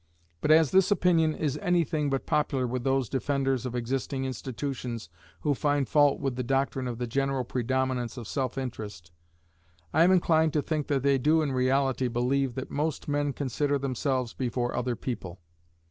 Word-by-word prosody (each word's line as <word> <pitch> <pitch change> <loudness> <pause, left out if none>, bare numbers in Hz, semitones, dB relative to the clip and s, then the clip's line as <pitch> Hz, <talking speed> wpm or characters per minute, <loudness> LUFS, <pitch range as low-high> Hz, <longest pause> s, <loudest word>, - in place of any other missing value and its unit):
But - - 0
as 155 -2 +6
this 190 -1 +4
opinion 170 -5 +3
is 150 -1 -2
any 175 -3 +2
thing 150 -1 -1
but 135 -1 -1
popular 140 -3 +1
with 125 0 -3
those 135 -1 +1
defenders 135 -1 0
of 125 - -5
existing 130 +2 -2
institutions 130 - -4 0.3
who 150 - +2
find 145 -1 0
fault 145 -2 +4
with 135 -3 -2
the 125 - -2
doctrine 135 0 0
of 120 -2 -4
the 125 - -2
general 135 +2 0
predominance 130 0 -1
of 120 -3 -6
self 130 0 -2
interest, 105 -10 -6 0.8
I 160 - +5
am 180 - +5
inclined 160 -4 +3
to 150 - +1
think 155 -3 -2
they 140 -1 +2
do 155 +4 +3
in 145 - -1
reality 130 0 +1
believe 125 +2 0
that 130 - -5
most 150 0 -2
men 145 0 0
consider 145 +2 0
themselves 130 -2 -1
before 120 -1 -2
other 125 -1 -1
people. 95 -8 -5
135 Hz, 175 wpm, -28 LUFS, 125-145 Hz, 0.8 s, as